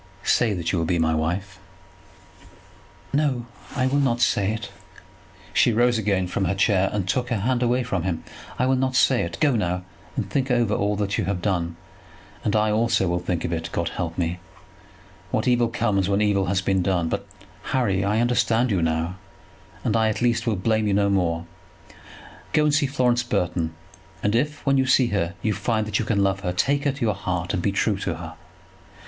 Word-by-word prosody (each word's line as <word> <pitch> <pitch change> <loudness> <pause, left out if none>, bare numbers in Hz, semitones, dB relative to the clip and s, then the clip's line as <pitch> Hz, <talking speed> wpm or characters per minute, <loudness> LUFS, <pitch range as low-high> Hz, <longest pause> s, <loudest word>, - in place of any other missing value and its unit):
"Say 110 -4 +2
that 85 -2 -2
you 90 - 0
will 80 - 0
be 90 - +1
my 80 -1 +2
wife." 90 +5 -2 1.5
"No, 140 -5 +1 0.3
I 130 -2 +1
will 135 +2 +2
not 125 -4 +1
say 105 -4 +2
it." 110 0 -5 0.8
She 150 -6 +4
rose 120 +1 +3
again 100 -3 +1
from 95 +2 -1
her 95 +2 0
chair, 95 -1 +2
and 100 -3 -2
took 125 +6 0
her 115 -5 -1
hand 125 +3 +1
away 125 +1 +2
from 100 -7 -2
him. 85 -2 -2 0.3
"I 125 - +2
will 130 0 +2
not 130 0 0
say 130 -1 +4
it. 85 0 -4
Go 145 -5 +3
now 90 -4 -1 0.3
and - - -2
think 135 -1 -1
over 120 -4 +2
all 105 0 0
that 100 0 -1
you - - 0
have 95 -1 -1
done; 85 -4 -1 0.7
and 105 - 0
I 105 0 +3
also 110 -2 +2
will 85 0 0
think 90 -1 -2
of 85 - -2
it. 80 0 -3
God 85 -1 -1
help 85 -2 -4
me. 90 0 -1 0.9
What 110 +7 -1
evil 120 -1 +3
comes, 105 -5 0
when 100 0 +2
evil 100 -2 +2
has 95 0 +1
been 95 -1 +1
done! 90 -2 +1
But, - - -3 0.4
Harry, 105 -8 +1
I 105 +3 +1
understand 120 0 +2
you 95 -4 +1
now, 80 +2 -1 0.7
and - - 0
I 110 -1 +3
at 110 - -2
least 120 0 +1
will 110 - +2
blame 110 +3 +1
you 100 - +2
no 100 0 +2
more. 85 -3 0 1.1
Go 150 - +4
and 150 -1 +2
see 145 -1 +3
Florence 125 -3 +2
Burton; 90 -8 -1 0.5
and 105 - +1
if, 145 +5 -1
when 135 -1 +3
you 130 - +1
see 130 -1 +4
her, 95 -3 -1
you 110 - +1
find 110 0 -1
that 105 -2 -1
you 115 - -1
can 100 -3 +1
love 95 0 +1
her, 90 -2 -2
take 140 +10 +1
her 140 - +3
to 140 +1 -11
your 110 -3 +2
heart, 90 -2 -3
and 90 - 0
be 100 - +1
true 100 +1 +1
to 90 -4 -2
her. 80 0 -8
105 Hz, 210 wpm, -24 LUFS, 90-120 Hz, 1.5 s, She